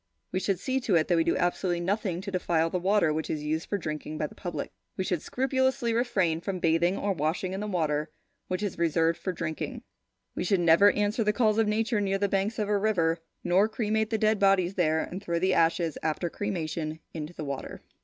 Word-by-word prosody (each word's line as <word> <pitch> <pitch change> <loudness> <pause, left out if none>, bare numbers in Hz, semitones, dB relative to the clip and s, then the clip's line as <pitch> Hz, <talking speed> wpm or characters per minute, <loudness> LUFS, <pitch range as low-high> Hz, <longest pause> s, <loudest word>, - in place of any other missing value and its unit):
We 185 - 0
should 190 -1 0
see 260 +5 0
to 230 -7 +1
it 160 -1 +3
that 175 - +4
we 165 - +3
do - - +1
absolutely 175 0 0
nothing 185 0 -1
to 200 0 -6
defile 165 -3 +1
the 180 - 0
water 185 -3 +2
which 160 +1 -3
is 150 -1 -2
used 155 +2 -2
for 205 - 0
drinking 155 -3 -5
by 155 - -1
the - - -8
public. 175 - -5 0.3
We 190 - 0
should 180 -4 -1
scrupulously 260 -2 0
refrain 190 -9 +1
from 190 +1 -3
bathing 170 +2 +2
or 200 -1 0
washing 165 +3 -1
in 190 - -3
the 210 - -3
water 155 -5 0 0.4
which 185 +3 -2
is 200 -5 -3
reserved 165 0 +2
for 185 - -2
drinking; 165 -3 -4 0.5
we - - -3
should 190 +1 +2
never 170 +4 +6
answer 210 +2 +1
the 210 0 +2
calls 215 -1 +2
of 220 - +3
nature 215 +1 +1
near 195 -1 +1
the 200 +1 +1
banks 195 +3 0
of 210 - -1
a 205 -1 +2
river, 175 -6 +1 0.2
nor 185 +5 +3
cremate 220 -1 0
the 225 - 0
dead 215 -1 +2
bodies 195 -2 +3
there 160 -4 +2
and 185 +2 -6
throw 170 -3 -1
the 185 +2 +2
ashes 165 -1 +2
after 160 +2 -1
cremation 160 -5 -3
into 155 +1 -6
the 155 - -5
water. 140 -1 -6
185 Hz, 225 wpm, -28 LUFS, 165-210 Hz, 0.5 s, never